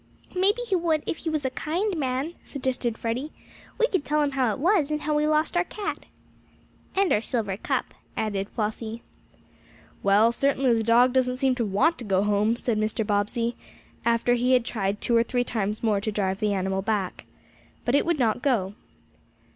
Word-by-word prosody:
"Maybe 405 Hz, +6 st, +2 dB
he 405 Hz, -5 st, 0 dB
would 330 Hz, -3 st, +1 dB
if -, -, -2 dB
he 325 Hz, -, -4 dB
was 305 Hz, -3 st, -1 dB
a 260 Hz, -, 0 dB
kind 355 Hz, +9 st, -1 dB
man," 270 Hz, +2 st, -2 dB
suggested 255 Hz, -4 st, -2 dB
Freddie. 250 Hz, +7 st, -3 dB, 0.5 s
"We 470 Hz, -, +4 dB
could 375 Hz, -9 st, -1 dB
tell 300 Hz, 0 st, +1 dB
him 285 Hz, -, 0 dB
how 260 Hz, -4 st, +1 dB
it -, -, -3 dB
was, 335 Hz, -1 st, +2 dB
and 300 Hz, 0 st, -1 dB
how 305 Hz, 0 st, -1 dB
we 300 Hz, 0 st, +2 dB
lost 310 Hz, +3 st, +1 dB
our 350 Hz, -, +3 dB
cat." 410 Hz, +3 st, -5 dB, 0.9 s
"And 390 Hz, -1 st, +3 dB
our 210 Hz, -, +2 dB
silver 220 Hz, -5 st, -2 dB
cup," 200 Hz, -, -2 dB, 0.2 s
added 205 Hz, -2 st, -2 dB
Flossie. 220 Hz, +1 st, -4 dB, 1.0 s
"Well, 205 Hz, +4 st, +4 dB
certainly 270 Hz, 0 st, +2 dB
the 225 Hz, -, +1 dB
dog 235 Hz, +3 st, +4 dB
doesn't 255 Hz, -1 st, +2 dB
seem 265 Hz, 0 st, +2 dB
to 245 Hz, -2 st, -1 dB
want 265 Hz, -, +2 dB
to -, -, -6 dB
go 195 Hz, -2 st, +1 dB
home," 210 Hz, +2 st, +2 dB
said 235 Hz, -3 st, -1 dB
Mr. 215 Hz, 0 st, -1 dB
Bobbsey, 225 Hz, +3 st, 0 dB, 0.5 s
after 235 Hz, +1 st, +2 dB
he 245 Hz, +1 st, +2 dB
had 250 Hz, -2 st, +3 dB
tried 205 Hz, -3 st, -2 dB
two 235 Hz, -, +1 dB
or 230 Hz, -, +6 dB
three 245 Hz, +1 st, 0 dB
times 210 Hz, -2 st, -2 dB
more 210 Hz, -3 st, +2 dB
to 215 Hz, -, -2 dB
drive 195 Hz, -2 st, -1 dB
the 210 Hz, -1 st, +1 dB
animal 190 Hz, 0 st, -1 dB
back. 200 Hz, -2 st, -2 dB, 0.6 s
But 245 Hz, -, +1 dB
it 285 Hz, -, +4 dB
would 340 Hz, -2 st, 0 dB
not 240 Hz, -2 st, +1 dB
go. 220 Hz, -9 st, +1 dB
245 Hz, 195 wpm, -26 LUFS, 215-295 Hz, 1.0 s, or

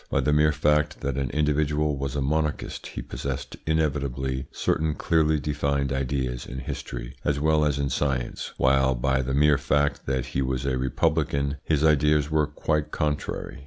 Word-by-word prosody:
By -, -, +1 dB
the 75 Hz, +3 st, +2 dB
mere 75 Hz, +1 st, +4 dB
fact 75 Hz, 0 st, +1 dB
that 70 Hz, -1 st, -2 dB
an 70 Hz, -2 st, -1 dB
individual 75 Hz, 0 st, +1 dB
was 70 Hz, -1 st, -4 dB
a 70 Hz, -, 0 dB
monarchist 75 Hz, +2 st, -1 dB
he -, -, -6 dB
possessed -, -, -5 dB
inevitably 70 Hz, -4 st, -1 dB
certain 80 Hz, -1 st, 0 dB
clearly 80 Hz, -2 st, +2 dB
defined 70 Hz, -1 st, -1 dB
ideas 65 Hz, -2 st, -2 dB
in 65 Hz, -, -7 dB
history 60 Hz, -2 st, -6 dB
as 70 Hz, 0 st, 0 dB
well 80 Hz, +1 st, +3 dB
as 75 Hz, -2 st, +1 dB
in 70 Hz, -1 st, -1 dB
science, 65 Hz, -3 st, -2 dB
while 65 Hz, 0 st, +3 dB
by 65 Hz, +2 st, +1 dB
the 65 Hz, +1 st, -2 dB
mere 75 Hz, -1 st, +4 dB
fact 75 Hz, +1 st, 0 dB
that 65 Hz, -1 st, 0 dB
he 70 Hz, -, +1 dB
was 65 Hz, 0 st, -1 dB
a 65 Hz, -2 st, +1 dB
republican, 70 Hz, +1 st, 0 dB
his 75 Hz, -2 st, +1 dB
ideas 75 Hz, 0 st, +3 dB
were 75 Hz, -1 st, +2 dB
quite 75 Hz, 0 st, -1 dB
contrary. 75 Hz, -2 st, -3 dB
70 Hz, 170 wpm, -26 LUFS, 65-75 Hz, -, mere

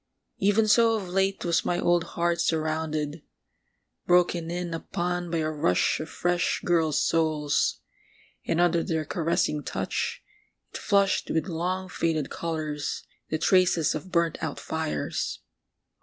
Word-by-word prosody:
Even 205 Hz, +3 st, +3 dB
so 225 Hz, +1 st, +5 dB
of 200 Hz, -4 st, -4 dB
late 195 Hz, +1 st, 0 dB
was 170 Hz, 0 st, +2 dB
my 175 Hz, -, 0 dB
old 175 Hz, -1 st, +3 dB
heart 170 Hz, 0 st, +1 dB
surrounded, 155 Hz, -1 st, -1 dB, 0.9 s
broken 175 Hz, -1 st, +3 dB
in 175 Hz, 0 st, -3 dB
upon 175 Hz, +1 st, -3 dB
by 165 Hz, -, -1 dB
a 155 Hz, -1 st, 0 dB
rush 155 Hz, +2 st, +1 dB
of 155 Hz, -, -5 dB
fresh 175 Hz, 0 st, 0 dB
girls' 160 Hz, -4 st, +2 dB
souls... 150 Hz, -, +1 dB, 0.6 s
and 165 Hz, -, 0 dB
under 175 Hz, -1 st, +3 dB
their 160 Hz, -1 st, -1 dB
caressing 160 Hz, -2 st, 0 dB
touch -, -, -3 dB, 0.5 s
it -, -, -4 dB
flushed 200 Hz, -2 st, +2 dB
with 160 Hz, -, 0 dB
long 180 Hz, +2 st, -2 dB
faded 160 Hz, -5 st, -1 dB
colours, 155 Hz, -3 st, -3 dB, 0.3 s
the 155 Hz, -, 0 dB
traces 175 Hz, -2 st, +3 dB
of 180 Hz, +4 st, -6 dB
burnt 170 Hz, -2 st, +1 dB
out -, -, -3 dB
fires 75 Hz, -1 st, -3 dB
170 Hz, 135 wpm, -27 LUFS, 155-180 Hz, 0.9 s, so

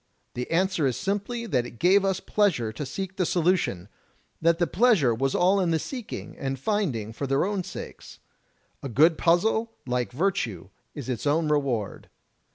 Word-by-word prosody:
The 125 Hz, 0 st, -4 dB
answer 170 Hz, -3 st, +1 dB
is 125 Hz, -, -1 dB
simply 205 Hz, +4 st, -2 dB
that 125 Hz, -, 0 dB
it 120 Hz, -, -13 dB
gave 190 Hz, -, +4 dB
us 190 Hz, -1 st, 0 dB
pleasure 180 Hz, -, +1 dB
to 140 Hz, +5 st, -5 dB
seek 190 Hz, +6 st, -5 dB
the 185 Hz, -, +2 dB
solution 170 Hz, -, +1 dB, 0.3 s
— -, -, -41 dB
that 165 Hz, 0 st, +3 dB
the 175 Hz, -, +2 dB
pleasure 185 Hz, -, +3 dB
was 135 Hz, +4 st, -1 dB
all 185 Hz, +3 st, +3 dB
in 180 Hz, -3 st, +1 dB
the 165 Hz, -, +2 dB
seeking 245 Hz, -, -6 dB
and 135 Hz, 0 st, -2 dB
finding 135 Hz, -, -1 dB
for 140 Hz, +4 st, -4 dB
their 135 Hz, +4 st, +2 dB
own 200 Hz, -2 st, -1 dB
sakes. 180 Hz, -, -9 dB, 0.6 s
A 140 Hz, -, -5 dB
good 155 Hz, +8 st, +5 dB
puzzle, 220 Hz, +8 st, +2 dB
like 125 Hz, -1 st, -1 dB
virtue, 125 Hz, -, -1 dB, 0.3 s
is 140 Hz, -5 st, -6 dB
its 130 Hz, +2 st, -3 dB
own 155 Hz, +2 st, +2 dB
reward. 135 Hz, -8 st, -1 dB
165 Hz, 175 wpm, -26 LUFS, 130-195 Hz, 0.6 s, good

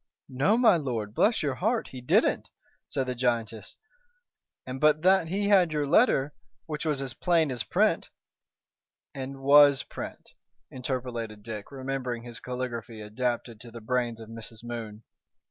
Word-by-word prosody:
"No, 145 Hz, -, +2 dB
my 225 Hz, -7 st, +5 dB
lord, 115 Hz, -8 st, -3 dB
bless 220 Hz, -, +2 dB
your 140 Hz, -3 st, 0 dB
heart! 220 Hz, -, -1 dB
he 130 Hz, -, -9 dB
didn't," 125 Hz, -, +2 dB, 0.4 s
said 135 Hz, -, -2 dB
the 125 Hz, -, -2 dB
giantess; 120 Hz, -3 st, -2 dB, 0.9 s
"and 130 Hz, +1 st, -6 dB
but 155 Hz, +1 st, +4 dB
that 190 Hz, -2 st, +4 dB
he 200 Hz, +4 st, -1 dB
had 185 Hz, -5 st, +5 dB
your 150 Hz, -1 st, 0 dB
letter, 145 Hz, -, +3 dB, 0.3 s
which 150 Hz, 0 st, -5 dB
was 140 Hz, -3 st, 0 dB
as 130 Hz, -2 st, -6 dB
plain 165 Hz, -5 st, +2 dB
as 120 Hz, -2 st, -3 dB
print -, -, +1 dB, 0.5 s
" -, -, -65 dB
"And 135 Hz, +1 st, -7 dB
was 145 Hz, 0 st, +7 dB
print," -, -, -9 dB, 0.4 s
interpolated 120 Hz, -5 st, -4 dB
Dick, 110 Hz, 0 st, -7 dB
remembering 130 Hz, -3 st, -4 dB
his 120 Hz, -1 st, -9 dB
caligraphy 120 Hz, -3 st, -5 dB
adapted 115 Hz, +1 st, -3 dB
to 120 Hz, -, -11 dB
the 115 Hz, 0 st, -9 dB
brains 120 Hz, 0 st, -1 dB
of 110 Hz, -, -10 dB
Mrs. 115 Hz, 0 st, -9 dB
Moon. 115 Hz, -2 st, -7 dB
130 Hz, 155 wpm, -27 LUFS, 115-150 Hz, 0.9 s, was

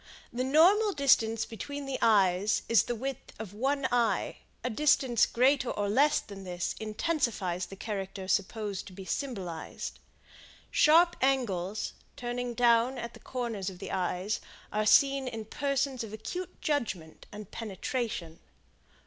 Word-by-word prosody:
The 250 Hz, +1 st, -1 dB
normal 370 Hz, +10 st, +5 dB
distance 225 Hz, -6 st, +3 dB
between 285 Hz, +5 st, -6 dB
the 270 Hz, -1 st, -3 dB
eyes 200 Hz, -2 st, +3 dB
is 230 Hz, -4 st, +5 dB
the 240 Hz, +2 st, -3 dB
width 265 Hz, +2 st, -5 dB
of 210 Hz, -3 st, -7 dB
one 270 Hz, +5 st, 0 dB
eye; 240 Hz, -2 st, +1 dB, 0.3 s
a 250 Hz, -, 0 dB
distance 265 Hz, -2 st, +3 dB
greater 255 Hz, +1 st, +3 dB
or 205 Hz, 0 st, -1 dB
less 275 Hz, +9 st, +4 dB
than 200 Hz, -2 st, -10 dB
this 180 Hz, -1 st, -3 dB
intensifies 215 Hz, -, -1 dB
the 195 Hz, -, -9 dB
character 195 Hz, -2 st, -5 dB
supposed 200 Hz, +1 st, -1 dB
to 190 Hz, -, -11 dB
be 190 Hz, 0 st, -9 dB
symbolized. 185 Hz, -, -4 dB, 0.7 s
Sharp 340 Hz, +3 st, +5 dB
angles, 215 Hz, -8 st, 0 dB, 0.2 s
turning 245 Hz, 0 st, -3 dB
down 240 Hz, +2 st, +4 dB
at 235 Hz, 0 st, -5 dB
the -, -, -13 dB
corners 230 Hz, -6 st, -3 dB
of 185 Hz, -, -10 dB
the 190 Hz, -, -7 dB
eyes, 185 Hz, +3 st, -1 dB, 0.3 s
are 215 Hz, 0 st, +1 dB
seen 275 Hz, +2 st, +5 dB
in 225 Hz, -3 st, -5 dB
persons 275 Hz, +1 st, -1 dB
of 215 Hz, -2 st, -8 dB
acute 360 Hz, -, -6 dB
judgment 215 Hz, -, -2 dB
and 210 Hz, -1 st, -9 dB
penetration. 215 Hz, -4 st, -4 dB
230 Hz, 140 wpm, -30 LUFS, 200-270 Hz, 0.7 s, normal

